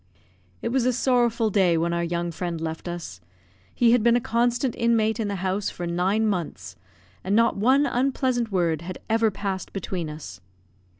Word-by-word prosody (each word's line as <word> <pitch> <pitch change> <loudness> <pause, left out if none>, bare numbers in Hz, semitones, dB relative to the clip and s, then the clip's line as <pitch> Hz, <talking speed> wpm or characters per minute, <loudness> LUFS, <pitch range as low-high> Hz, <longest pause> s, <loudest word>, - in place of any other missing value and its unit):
It - - 0
was 250 0 +1
a 255 - +2
sorrowful 240 -3 +2
day 185 -4 +3
when 170 +1 0
our 170 0 0
young 170 0 -2
friend 170 0 -4
left 160 +1 -5
us; 170 - -6 0.5
he 235 -1 +4
had 245 -1 +4
been 235 +1 +4
a - - +4
constant 240 0 0
inmate 225 -1 +1
in 220 - -1
the 200 - -2
house 190 +2 0
for 175 - -6
nine 185 +6 +1
months, 175 - -3 0.5
and 195 +2 0
not 230 +1 +3
one 260 +8 +3
unpleasant 255 -3 0
word 170 -5 +1
had 180 +1 -6
ever 225 0 +3
passed 195 -1 -4
between 180 -4 -4
us. 145 - -9
205 Hz, 180 wpm, -25 LUFS, 170-235 Hz, 0.5 s, he